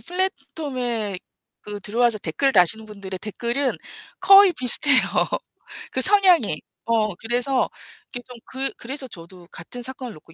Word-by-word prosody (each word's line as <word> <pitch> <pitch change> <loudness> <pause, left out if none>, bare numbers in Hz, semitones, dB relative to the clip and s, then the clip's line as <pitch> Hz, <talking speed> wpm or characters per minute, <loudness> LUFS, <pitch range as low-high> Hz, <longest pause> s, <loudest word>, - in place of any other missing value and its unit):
플랫폼에 255 - -3 0.4
그 205 -1 -7
들어와서 225 +2 +1
댓글 265 - -1
다시는 205 +4 +3
분들의 200 -3 -8
댓글은 240 +5 -1 0.5
거의 390 -1 +7
비슷해요, 260 0 +4 0.9
그 260 - -1
성향이. 365 - +4 0.3
어, 215 -4 +1
그래서 245 +5 -1 0.4
이게 245 - -3
좀 250 -1 -11
그 265 +1 -3
그래서 265 +2 -5
저도 175 -2 -12
같은 245 +9 -9
사건을 255 -2 -5
놓고 165 +1 -17
240 Hz, 290 characters per minute, -22 LUFS, 205-270 Hz, 0.9 s, 거의